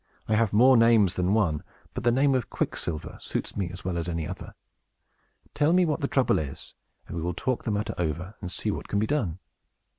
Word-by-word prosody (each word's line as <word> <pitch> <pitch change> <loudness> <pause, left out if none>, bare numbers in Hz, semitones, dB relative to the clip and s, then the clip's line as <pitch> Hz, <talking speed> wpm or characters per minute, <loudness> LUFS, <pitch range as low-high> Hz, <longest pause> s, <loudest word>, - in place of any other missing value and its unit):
I 110 - +1
have 110 -1 +3
more 125 +4 +6
names 115 -5 +5
than 90 +3 +1
one; 85 -9 +1 0.3
but - - -4
the 120 - +4
name 135 +3 +3
of 130 -3 0
Quicksilver 80 -3 -3
suits - - -4
me 95 -4 -1
as 90 +1 -9
well 90 -2 -1
as 85 +1 -3
any 85 -2 -2
other. - - -8 1.0
Tell 150 +3 +3
me 180 0 +5
what 150 -3 0
the 140 - +1
trouble 135 -2 +2
is, 70 -3 -6 0.3
and - - -7
we 85 - -2
will 85 +1 -2
talk 130 +5 -2
the 110 - 0
matter 105 0 -1
over, 85 +4 -2
and 90 -3 -5
see - - -1
what - - -5
can 100 - -1
be 105 - +2
done." 110 - -1
105 Hz, 220 wpm, -27 LUFS, 85-125 Hz, 1.0 s, more